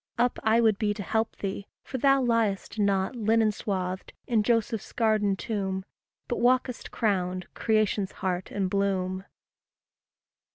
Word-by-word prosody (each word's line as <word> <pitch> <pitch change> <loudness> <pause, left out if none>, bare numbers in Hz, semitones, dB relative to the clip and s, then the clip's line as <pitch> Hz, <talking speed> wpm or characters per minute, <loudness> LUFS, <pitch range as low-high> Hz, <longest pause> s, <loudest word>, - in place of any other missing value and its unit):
Up 245 +1 +1
I 220 +2 +4
would 220 -3 +3
be 205 -2 +1
to 205 - -5
help 220 +2 -1
thee 195 0 -4 0.2
for 260 - -5
thou 275 +1 +4
liest 225 -3 0
Not, 200 +2 +1
linen 225 -1 +3
swathed 185 -3 -3
in 230 -3 +2
Joseph's 225 -1 0
garden 215 -3 +2
tomb, 190 -2 -3 0.4
But 240 - -2
walkest 250 0 +1
crowned, 185 -4 0
creation's 215 -3 +1
heart 185 -1 -2
and 195 -2 -1
bloom. 190 -1 -1
210 Hz, 135 wpm, -27 LUFS, 195-230 Hz, 0.4 s, I